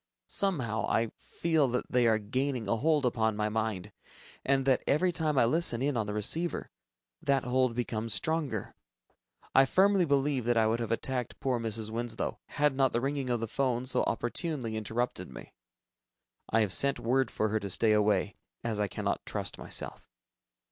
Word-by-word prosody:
Somehow, 130 - 0
I 115 -1 +1
feel 160 -4 +1
that 125 0 -2
they 125 -2 +4
are 110 -1 +4
gaining 125 +2 -2
a 115 - +1
hold 150 +2 +2
upon 110 -3 +1
my 105 0 0
mind, 105 -3 -2 0.5
and 135 -1 +2
that 130 -2 +3
every 180 +5 +3
time 155 -4 0
I 125 - +5
listen 140 -2 +2
in 145 -1 +1
on 110 -3 -1
the 105 - -3
receiver, 165 +11 0 0.5
that 140 -1 +2
hold 125 -1 +1
becomes 115 -2 -2
stronger. 155 - -2 0.8
I 135 0 +6
firmly 195 +1 +4
believe 140 -3 +1
that 120 -1 +2
I 110 - +4
would 115 +2 +1
have 115 -1 -3
attacked 125 +1 -2
poor 130 -3 0
Mrs. 110 -1 -3
Winslow, 115 0 -3
had 145 -2 +1
not 135 -2 +2
the 120 - +2
ringing 135 -1 -2
of 120 -2 0
the 115 - -2
'phone 130 -1 0
so 125 -1 +1
opportunely 120 0 -2
interrupted 110 +3 -2
me. - - -11 1.0
I 110 - +3
have 100 -3 +1
sent 140 -1 +2
word 130 +3 +1
for 110 - -1
her 110 +1 0
to 100 -1 -5
stay 110 +4 +2
away... 105 -2 +2 0.3
as 115 -3 -1
I 105 - +1
cannot - - -2
trust - - -4
myself. - - -5
120 Hz, 180 wpm, -30 LUFS, 110-140 Hz, 1.0 s, I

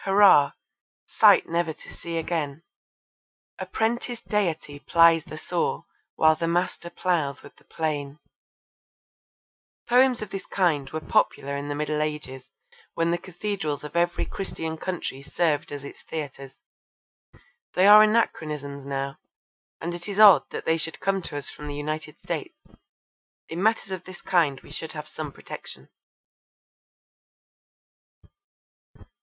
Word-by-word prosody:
Hurra! 195 -7 +6 0.5
Sight - - +5
never 170 -1 0
to - - -12
see 170 -1 -5
again, 160 -2 -2 1.0
A - - -5
prentice 235 +1 -1
Deity 165 -8 -1
plies 165 0 +5
the 155 - -8
saw, 175 +2 -2 0.3
While 155 0 +5
the 165 +1 -2
Master 175 0 -1
ploughs 160 -7 -1
with - - -14
the - - -24
plane. 145 -3 -3 1.7
Poems 250 -1 +4
of 205 - -9
this 195 - -6
kind 155 -8 +1
were 155 +2 -4
popular 140 -9 +1
in 140 +1 -4
the 145 - -3
Middle 150 0 -1
Ages 150 -4 -4 0.5
when 165 0 +1
the 175 - 0
cathedrals 175 -5 -4
of 150 +2 -8
every 175 0 +1
Christian 160 -4 -5
country 160 -5 -4
served 150 0 0
as 145 -1 -6
its 140 - -10
theatres. 140 -3 -7 1.2
They 185 - +4
are 210 +1 +10
anachronisms 150 -10 0
now, 135 0 -3 0.6
and 170 +2 -4
it 175 +3 -7
is 200 - -4
odd 205 -4 +8
that - - -6
they 160 0 +2
should 160 -1 -4
come 195 -1 0
to 145 - -6
us 145 - -5
from 150 - -9
the 145 - -5
United 150 +1 -4
States. - - -5 0.9
In 165 +2 -4
matters 220 -1 +1
of 185 -2 -5
this 185 -1 -11
kind 165 -8 +2
we - - -15
should 160 - -6
have 150 -1 -7
some - - -6
protection. - - -10
160 Hz, 140 wpm, -25 LUFS, 145-185 Hz, 1.7 s, are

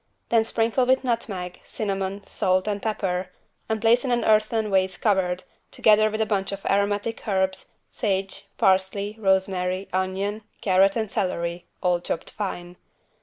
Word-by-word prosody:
Then 230 -1 +4
sprinkle 230 +3 +1
with 260 +1 +3
nutmeg, 200 -7 -3
cinnamon, 195 -1 -3
salt, 185 +1 0
and 205 -1 -1
pepper, 190 -4 -2 0.4
and 220 0 0
place 230 +3 +4
in 265 - -2
an 240 -1 +1
earthen 215 0 +2
vase 190 -1 +2
covered, 185 -4 +1 0.3
together 215 0 +4
with 215 +1 -2
a - - +3
bunch 200 -2 -1
of 200 0 -7
aromatic 205 +3 0
herbs, 190 -2 -1 0.2
sage, 195 -4 -2
parsley, 190 +2 +2
rosemary, 190 -1 +1
onion, 190 +3 -1 0.2
carrot 195 0 +4
and 220 -3 -2
celery, 170 -2 -2 0.2
all 180 -1 +3
chopped 170 - -4
fine. 175 -4 -5
195 Hz, 145 wpm, -24 LUFS, 185-215 Hz, 0.4 s, Then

